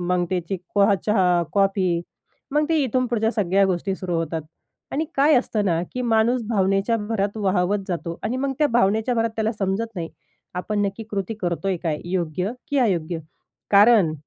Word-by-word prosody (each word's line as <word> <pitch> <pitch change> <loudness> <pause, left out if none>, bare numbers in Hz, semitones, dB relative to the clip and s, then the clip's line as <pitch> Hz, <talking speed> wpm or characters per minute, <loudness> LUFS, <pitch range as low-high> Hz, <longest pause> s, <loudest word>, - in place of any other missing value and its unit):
मग 175 0 +1
त्याची 180 +1 -2 0.2
कोहा 200 0 +5
चहा, 180 -5 +3
कॉफी 195 -3 +2 0.5
मग 300 +1 +3
ते 325 - +2
इथून 255 0 0
पुढच्या 225 -2 +1
सगळ्या 195 -2 +2
गोष्टी 190 +1 -1
सुरू 180 -2 -3
होतात. 165 -1 -2 0.5
आणि 305 +3 0
काय 290 +3 +5
असतं 220 -4 0
ना 170 -3 +1
की 250 - -3
माणूस 235 +1 +2
भावनेच्या 195 +1 +2
भरात 205 -1 -2
वाहावत 200 -1 +1
जातो 170 -1 -4
आणि 230 +4 -1
मग 270 +1 -1
त्या 300 - +4
भावनेच्या 220 +1 +2
भरात 230 0 +1
त्याला 220 0 0
समजत 200 +1 -1
नाही. 165 -2 -4 0.5
आपण 205 +3 -2
नक्की 200 +3 -5
कृती 200 +1 -3
करतोय 180 +2 -1
काय 160 -4 -1
योग्य 180 +1 -2 0.2
की 285 - +1
अयोग्य? 175 -8 +1 0.5
कारण 205 -4 +6
200 Hz, 170 wpm, -23 LUFS, 180-225 Hz, 0.5 s, कारण